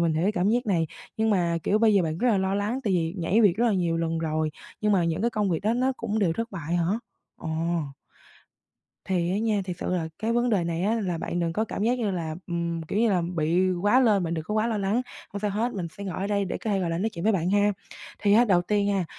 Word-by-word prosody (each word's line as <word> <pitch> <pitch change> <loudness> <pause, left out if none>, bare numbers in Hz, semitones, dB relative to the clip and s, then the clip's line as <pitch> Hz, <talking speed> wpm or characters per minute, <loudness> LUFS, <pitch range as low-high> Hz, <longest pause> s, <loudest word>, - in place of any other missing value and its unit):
mình 170 -1 +2
hiểu 160 - 0
cái 200 +4 +2
cảm 185 0 +1
giác 240 +2 +1
này, 170 -5 +1 0.3
nhưng 220 0 +1
mà, 170 -4 +1
kiểu, 210 - +2
bây 220 -2 +4
giờ 195 - +4
bạn 160 -1 -2
rất 245 - +2
là 210 - +3
lo 190 0 0
lắng 210 +6 -1
tại 200 - +1
vì 165 0 0
nhảy 180 +6 +2
việc 200 -5 +4
rất 240 - +2
là 230 - +3
nhiều 175 -4 +1
lần 165 0 -1
rồi 155 -1 -1 0.3
nhưng 210 -1 +2
mà 180 -3 +3
những 165 +2 -1
cái 235 - +1
công 210 -3 0
việc 165 - 0
đó 215 - +2
nó 255 +2 +1
cũng 220 -2 -2
đều 190 -6 +2
thất 230 +6 -4
bại 170 -3 -4
hả? 170 - +1 0.5
Ồ. 160 - -7 1.6
Thì 175 -2 0
á 195 - 0
nha, 215 -2 +1
thiệt 180 -2 -5
sự - - -3
là 175 -3 -1
cái 225 +2 -1
vấn 240 +1 +2
đề 195 -6 +2
này 170 +1 -2
á, 215 +3 +2
là 180 -5 -2
bạn 175 - -3
đừng 165 -1 0
có 215 +6 0
cảm 210 - -4
giác 245 +3 +2
như 215 -4 0
là, 165 -4 -3
ừm, 170 -1 -2
kiểu 195 +6 -3
như 230 -1 +3
là, 180 -3 +2
bị 170 +4 +2
quá 225 +6 +5
lên, 210 -7 +3
bạn 165 0 -2
đừng 160 -1 -4
có 210 - -3
quá 215 +1 +2
lo 225 -2 -1
lắng. 205 +5 +1 0.3
Hông 200 - -4
sao 210 0 0
hết, 225 +5 -1
mình 185 -4 -3
sẽ 200 - -5
ngồi 185 -4 -4
ở 195 - -1
đây 200 -1 0
để 180 - -4
có 220 - -3
thể, 200 - +1
gọi 175 -2 -1
là, 165 - -1
nói 215 - 0
chuyện 170 -4 -6
với 220 - +4
bạn 180 -1 0
ha. 205 +1 +3 0.5
Thì 200 -1 +2
á, 235 +3 +6
đầu 180 -5 +3
tiên 205 +2 +1
ha, 195 -3 0
195 Hz, 295 wpm, -26 LUFS, 170-215 Hz, 1.6 s, á